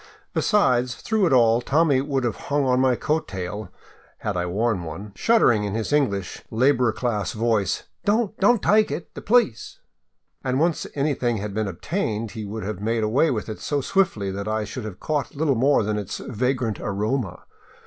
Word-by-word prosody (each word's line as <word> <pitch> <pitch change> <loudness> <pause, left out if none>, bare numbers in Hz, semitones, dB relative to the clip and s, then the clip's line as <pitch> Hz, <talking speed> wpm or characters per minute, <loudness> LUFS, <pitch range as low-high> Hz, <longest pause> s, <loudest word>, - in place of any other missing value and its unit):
Besides, 125 - +2
through 215 -4 +1
it - - 0
all 120 -2 +5
Tommy 140 0 +3
would 135 -2 -1
have 120 -3 0
hung 145 -1 +1
on 125 -1 +3
my 130 -1 +3
coat 155 +5 -1
tail, 95 +1 -5 0.5
had - - -3
I 90 0 -1
worn 105 +2 0
one, 95 +6 -7
shuddering 120 - +3
in 100 0 -2
his 115 +5 -2
English, 100 -11 0
laboring 120 -1 +2
class 115 -5 -1
voice, 110 -4 0
" - - -52
Don't! 215 0 +1
Don't 215 +2 +4
tyke 215 +1 +4
it! 170 - -6
The - - -8
police! 215 - +1 0.2
" - - -54
— - - -47
and 130 0 0
once 165 +1 +1
anything 135 -5 0
had 105 0 -4
been 110 0 -1
obtained, 110 - -3
he 110 -2 -6
would 110 +2 -5
have 100 -1 -4
made 115 +1 0
away 125 +9 +3
with 115 -6 -2
it 110 - -6
so 145 - -1
swiftly 130 - 0
that 100 +2 -5
I 110 0 0
should 115 +2 -6
have 100 -4 -7
caught 150 -2 -2
little 145 -1 +2
more 130 0 +3
than 105 0 -1
its 100 -1 -5
vagrant 125 -1 -2
aroma. 105 0 -2
120 Hz, 195 wpm, -24 LUFS, 105-145 Hz, 0.5 s, all